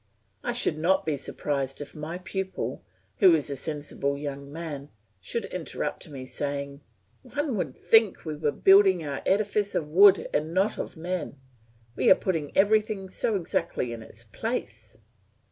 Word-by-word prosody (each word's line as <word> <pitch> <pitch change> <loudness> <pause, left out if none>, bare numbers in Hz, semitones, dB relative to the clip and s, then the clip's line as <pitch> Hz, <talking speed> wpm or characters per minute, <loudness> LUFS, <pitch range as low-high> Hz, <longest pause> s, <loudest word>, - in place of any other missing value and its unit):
I - - -1
should 155 - 0
not 180 +4 +2
be 155 -2 0
surprised 140 -1 -3
if 145 - -7
my 155 +3 -5
pupil, 190 +1 -4 0.3
who 185 -5 +7
is 150 -2 -1
a - - -2
sensible 145 -1 -2
young 140 -1 -6
man, 150 -3 -6 0.3
should 230 - -3
interrupt 180 -1 -4
me 135 -3 -7
saying, 140 +1 -4 0.4
"One 285 0 -2
would 160 -9 -3
think 225 -5 +3
we 155 -1 -3
were 150 -1 0
building 195 -3 +5
our 140 -2 -4
edifice 205 0 +1
of 150 - 0
wood 190 +3 +6
and 155 +3 -1
not 195 +3 +2
of - - -5
men; 170 -4 -4 0.6
we - - +3
are - - +9
putting 160 -6 -2
everything 210 -1 +2
so 210 +3 0
exactly 165 -8 -1
in 115 - -7
its 110 - -7
place!" - - -5
160 Hz, 160 wpm, -27 LUFS, 145-190 Hz, 0.6 s, are